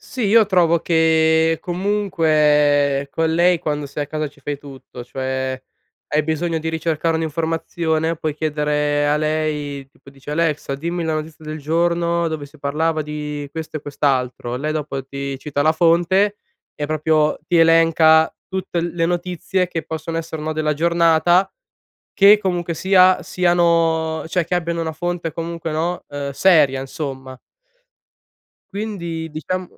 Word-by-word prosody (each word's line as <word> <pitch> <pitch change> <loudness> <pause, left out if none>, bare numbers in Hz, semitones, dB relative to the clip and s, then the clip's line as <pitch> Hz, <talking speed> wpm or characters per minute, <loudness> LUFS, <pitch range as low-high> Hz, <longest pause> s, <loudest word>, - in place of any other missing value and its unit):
Sì, 255 - -6
io 220 +1 +5
trovo 175 -4 +3
che, 160 0 +3
comunque, 155 -7 +2
con 160 +2 0
lei 175 +1 +4
quando 150 -2 -3
sei 145 +1 -4
a - - -14
casa 155 0 -3
ci 140 - -23
fai 145 +1 -4
tutto, 135 -3 -11
cioè, 130 +1 -3 0.5
hai 150 - +1
bisogno 160 +2 -1
di 160 - -3
ricercare 160 0 -1
un'informazione 160 0 -1
puoi 155 -1 -2
chiedere 150 -1 0
a 145 - +2
lei, 150 -3 -2
tipo 140 - -21
dici: 140 +1 -11
"Alexa, 150 -3 -1
dimmi 170 +4 -3
la 160 -1 -1
notizia 155 0 -6
del 155 0 -6
giorno, 170 +2 0
dove 155 -3 -5
si 155 +2 -19
parlava 155 +3 0
di 150 -1 -5
questo 160 0 -6
e - - -15
quest'altro". 130 -4 -1
Lei 150 +4 -3
dopo 145 -3 -4
ti 140 0 -5
cita 145 +1 -2
la 155 +2 +4
fonte, 175 +5 +2 0.4
e 150 - -3
proprio 155 0 +1
ti 175 - +1
elenca 165 -1 +5 0.2
tutte 190 -2 -3
le 170 0 -1
notizie 180 +1 -1
che 165 -2 -4
possono 160 +1 -5
essere 160 -1 -5
un 150 - -6
no, - - 0
della 155 -1 0
giornata, 170 +3 +3 0.6
che 200 +2 +7
comunque 175 -4 -2
sia, 185 +2 +4
siano 165 -2 +1
cioè, 170 0 0
che 180 - -1
abbiano 170 -1 -1
una 160 -1 -3
fonte 175 +1 -3
comunque, 165 0 -5
no, 170 +3 -2
uhm, 145 -1 -5
seria 145 -4 +4
insomma. 135 -1 -6 1.4
Quindi, 170 -6 -4
diciam 185 +4 -3
160 Hz, 150 wpm, -20 LUFS, 150-170 Hz, 1.4 s, che